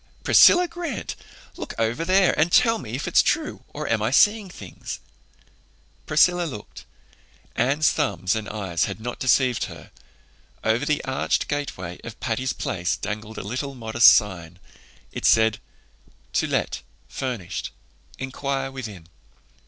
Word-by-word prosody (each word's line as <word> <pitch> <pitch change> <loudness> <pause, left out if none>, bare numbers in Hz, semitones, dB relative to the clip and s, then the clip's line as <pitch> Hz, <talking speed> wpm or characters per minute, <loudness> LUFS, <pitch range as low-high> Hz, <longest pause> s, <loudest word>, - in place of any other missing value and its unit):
Priscilla 355 0 +7
Grant, 335 -7 -5 0.4
look - - -6
over 115 +7 0
there 190 +2 +4
and 160 +2 +2
tell 230 0 +4
me 115 0 -6
if 135 - -4
it's - - +5
true, - - -1
or - - -6
am 115 -2 +1
I 110 - +1
seein' 205 - +4
things?" 100 - -8 1.1
Priscilla 175 +3 +4
looked. 115 -10 -9 0.7
Anne's 145 +5 +2
thumbs 120 - 0
and 110 -2 -4
eyes 95 -6 -1
had - - -6
not 120 +2 -6
deceived 130 -2 +2
her. - - -11 0.7
Over 110 +2 +1
the 150 -1 0
arched 130 0 0
gateway 95 - -4
of 115 -2 -9
Patty's 130 +2 -1
Place 90 0 -2
dangled 110 +1 -6
a - - -5
little, 130 +7 -4
modest 115 0 +4
sign. 90 -5 +3 0.5
It - - -6
said 110 -1 +4 0.7
"To - - +1
Let, - - -1 0.3
Furnished. 110 -9 -4 0.5
Inquire 135 0 -3
Within." 110 -10 -8
125 Hz, 135 wpm, -24 LUFS, 105-150 Hz, 1.1 s, Priscilla